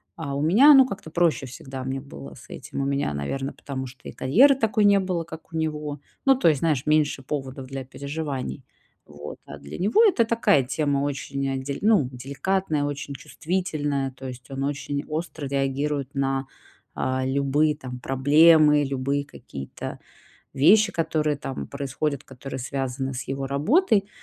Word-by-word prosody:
А 150 -4 -5
у 140 - -1
меня 215 - +7
оно 270 -2 +8
как-то 200 -8 -7
проще, 170 -4 +2
всегда 130 +1 -8
мне 135 +1 -3
было 70 - -10
с - - -15
этим. - - -6
У - - -1
меня, 140 - 0
наверно, 135 - -3
потому 135 -2 -6
что 130 -2 -12
и - - -7
карьеры 255 - +5
такой 220 -4 +2
не 200 -1 +6
было, 185 -3 -1
как 160 0 -11
у - - -2
него. 150 -2 -3 0.3
Ну, 270 -1 +6
то - - +3
есть, 150 -4 +3
знаешь, 150 -6 +1
меньше 150 -2 +2
поводов 135 -1 -5
для 135 0 -5
переживаний. 140 0 -5 0.4
Вот, 75 0 -9
а - - -9
для 70 0 -9
него 210 - +4
это 310 - +4
такая 225 - +3
тема 140 +2 0
очень, 140 -1 -2
дель 140 +1 -4
ну, 205 - +3
деликатная, 145 +5 -1
очень 145 0 -4
чувствительная, 145 -3 -2
то 130 +1 -9
есть 125 +1 -9
он 135 0 -4
очень 140 0 -2
остро 155 -1 -4
реагирует 140 +1 -1
на, 135 0 0 0.5
э, 130 0 -1
любые, 140 +3 +2
там, 130 -4 -8
проблемы, 150 +3 +5
любые 140 +1 -1
какие-то 70 - -8 0.6
вещи, 200 +10 +5
которые 155 -2 0
там 135 -1 -5
происходят, 140 0 -3
которые 135 +1 -8
связаны 135 +1 -3
с 125 - -4
его 135 0 -3
работой. 200 - +2
140 Hz, 165 wpm, -25 LUFS, 135-160 Hz, 0.6 s, оно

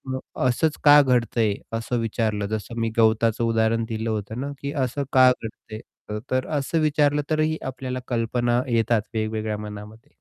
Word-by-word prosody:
अ, - - -3 0.3
असंच 150 +5 +1
का 145 0 +8
घडतंय, 120 -5 +1 0.2
असं 120 +2 -2
विचारलं 110 -2 -1
जसं 110 +2 -4
मी 115 0 0
गवताचं 115 +1 +3
उदाहरण 115 0 +1
दिलं 110 0 -3
होतं 110 +2 -3
ना, 140 +1 -4
की 140 0 -3
असं 135 0 -1
का 130 -1 +7
घडतंय? 110 -2 -7 0.3
अ, 105 - -3
तर 130 0 0
असं 145 +4 -1
विचारलं 150 -1 +2
तरीही 155 0 +1
आपल्याला 130 -1 -4
कल्पना 120 0 0
येतात 115 -2 +2
वेगवेगळ्या 110 -1 -2
मनामध्ये. 105 +1 -10
115 Hz, 160 wpm, -24 LUFS, 110-130 Hz, 0.3 s, का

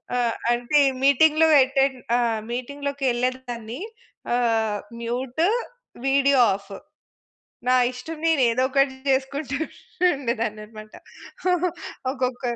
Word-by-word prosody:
ఆహ్, 240 -2 +1 0.2
అంటే 245 +5 +2 0.2
మీటింగ్‌లు 310 +3 +5 0.2
ఎటన్ 270 -1 +1 0.5
మీటింగ్‌లోకెళ్ళేదాన్ని 255 -2 -3 0.5
ఆహ్, 225 -3 +1 0.2
మ్యూటు, 255 +7 -1 0.6
వీడియో 275 -1 +4
ఆఫ్ 200 0 -12 1.0
నా 255 - +4 0.2
ఇష్టం 280 +6 -8
నేను 315 -5 +3
ఏదో 255 - 0
ఒకటి 275 0 +2 0.2
చేసుకుంటుండేదాన్నన్నమాట. 265 - -2 1.2
ఒక్కొక్క 255 -2 -3
260 Hz, 75 wpm, -24 LUFS, 240-280 Hz, 1.2 s, మీటింగ్‌లు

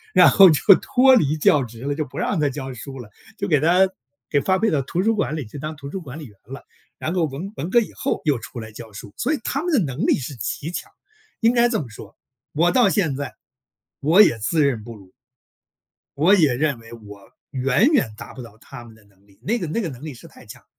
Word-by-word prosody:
然 - - +8
后 195 -2 +8
就 155 - +2 0.2
脱 260 +1 +4
离 155 - +2
教 145 -2 +3
职 115 -1 -10
了， 145 +1 -1
就 155 +2 -2
不 130 - -12
让 195 - -1
他 145 -2 +2
教 135 -1 -6
书 135 +3 -9
了， 115 -5 -11 0.3
就 - - -3
给 150 -4 +3
他 180 +5 +4 0.4
给 145 - +1
发 190 +4 +1
配 220 +2 +1
到 145 - +1
图 170 +7 -2
书 225 +2 +2
馆 200 -7 -1
里 150 -4 -5
去 115 +7 -10
当 155 +2 -5
图 140 -1 -9
书 190 - -5
管 145 -3 -9
理 155 - -8
员 105 -6 -15
了， 135 +4 -10 0.3
然 160 - -3
后 175 -3 +1
文 155 +8 -7
文 155 +6 -4
革 240 - +5
以 230 - -4
后 - - -3
又 145 -5 +1
出 120 +1 -9
来 110 -1 -9
教 110 0 -11
书， 100 0 -11
所 310 - 0
以 - - -7
他 275 - -2
们 355 - -2
的 300 - +3
能 145 -6 -2
力 - - +3
是 135 0 -6
极 135 - -5
强。 - - -7 0.5
应 230 +1 +4
该 240 0 +4
这 235 -2 -1
么 145 - -5
说， 110 0 -13 0.4
我 170 +4 +2
到 250 -2 +4
现 165 -10 0
在 140 -2 -6 0.6
我 160 +8 +5
也 120 - +4
自 150 +9 +1
认 135 -6 0
不 115 +2 -10
如， 95 -3 -17 1.0
我 165 +8 +4
也 155 -9 +4
认 140 -3 -1
为 115 0 -15
我 105 -3 -13 0.2
远 135 - +2
远 170 - +2
达 - - -10
不 130 - -9
到 115 -2 -14
他 125 +1 -12
们 115 - -14
的 110 - -23
能 100 -1 -29
力， 100 -1 -25
那 225 - -1
个 175 -9 -4
那 160 - -2
个 195 - -3
能 135 -1 -10
力 155 - -6
是 120 - -14
太 - - -17
强。 - - -13
145 Hz, 275 characters per minute, -22 LUFS, 120-180 Hz, 1.0 s, 然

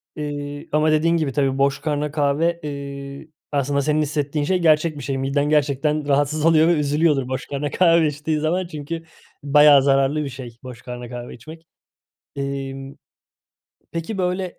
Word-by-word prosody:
Eee, 145 -1 -5
ama 155 +1 +2
dediğin 165 +2 +2
gibi 155 -4 -1
tabii 135 -1 0
boş 140 0 +1
karnına 150 -1 -2
kahve, 155 +3 +1
eee, 140 0 -7 0.2
aslında 140 0 0
senin 155 +2 +1
hissettiğin 145 0 -1
şey 185 +3 +1
gerçek 155 -1 +2
bir 145 - -7
şey. 135 0 -2
Miden 135 +2 0
gerçekten 150 0 +1
rahatsız 145 +2 +1
oluyor 160 -1 +5
ve 175 - +4
üzülüyordur 150 -2 +1
boş 130 0 -4
karnına 145 +1 -3
kahve 170 -3 +4
içtiği 150 +1 -2
zaman. 175 +4 -1
Çünkü 165 +1 -6 0.4
bayağı 145 -1 +6
zararlı 135 +2 +2
bir 140 - -4
şey 125 -3 -9
boş 125 -2 -9
karnına 125 -1 -8
kahve 120 0 -7
içmek. 160 +7 -13 0.7
İmm, 135 0 -5 1.0
peki, 170 +5 -4
böyle, 180 0 -2
145 Hz, 160 wpm, -21 LUFS, 140-155 Hz, 1.0 s, bayağı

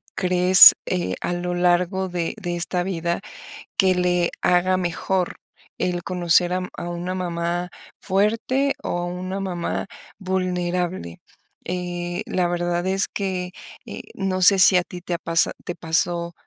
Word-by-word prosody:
¿crees, 180 0 +8
eh, 180 -1 -1
a - - -2
lo 175 0 -3
largo 180 +2 +1
de 175 -2 -3
de 175 -2 -3
esta 175 +1 -1
vida 170 -2 -2 0.6
que 190 -1 +3
le 180 -1 +1
haga 180 +1 +2
mejor 180 +1 -2 0.4
el 175 -1 -2
conocer 175 -1 +2
a 185 - 0
u 180 - -5
a 175 - -5
una 175 +2 -4
mamá 175 0 -3 0.3
fuerte 225 +8 0
o 175 - -2
a 175 - -3
una 185 +2 -5
mamá 180 -2 -3 0.3
vulnerable? 180 - -2 0.4
Eh, 175 +1 -4
la 180 -1 0
verdad 175 0 -2
es 190 +1 0
que, 185 -2 -4 0.3
eh, - - -8
no 190 -1 -2
sé 195 +2 +7
si 185 0 +6
a 180 - +2
ti 180 - -9
te 180 - -5
ha - - 0
pasa 165 0 +2
te 175 - -5
pasó 170 +1 -1
180 Hz, 155 wpm, -22 LUFS, 175-185 Hz, 0.6 s, crees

